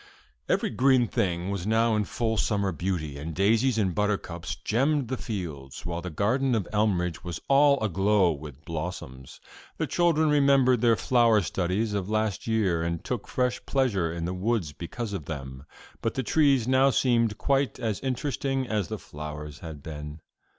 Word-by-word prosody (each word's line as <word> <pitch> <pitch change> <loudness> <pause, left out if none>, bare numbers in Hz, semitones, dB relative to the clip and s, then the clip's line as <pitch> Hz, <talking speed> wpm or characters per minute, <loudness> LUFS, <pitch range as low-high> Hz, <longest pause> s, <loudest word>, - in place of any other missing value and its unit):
Every - - +1
green 130 -2 +3
thing 90 -1 -1
was 100 -1 -3
now 110 +1 +3
in 105 -1 +1
full 110 +1 -1
summer 100 -2 0
beauty, 80 -4 -3
and 80 +2 -6
daisies 115 +5 +3
and 95 -5 +1
buttercups 100 -5 -2
gemmed 135 +3 0
the 130 - -1
fields, 80 - -6
while 85 0 -3
the 90 - -5
garden 120 - +1
at 105 -5 0
Elmridge 90 -6 0
was 85 -2 -5
all 140 0 +5
aglow 95 -2 +3
with 75 0 -9
blossoms, 75 -6 -6 0.4
The - - 0
children 160 -3 +2
remembered 135 -4 +4
their 115 -2 +5
flower 115 -3 +3
studies 95 +5 -1
of 100 -1 -2
last 110 -2 -1
year, 100 -7 +1
and 85 0 -2
took 120 -5 -4
fresh 125 -1 -1
pleasure 105 -12 +1
in 85 0 -4
the 90 - -2
woods 95 -4 -1
because 105 - -5
of 90 -7 -4
them; 70 -3 -7 0.4
but - - -1
the 130 - -1
trees 135 -1 +3
now 130 +1 +4
seemed 115 -5 +2
quite 140 -1 +1
as 110 -4 -2
interesting 135 0 -2
as 105 -6 -1
the - - -4
flowers 75 0 -8
had 80 -4 -9
been. 75 0 -7
105 Hz, 170 wpm, -27 LUFS, 85-125 Hz, 0.4 s, all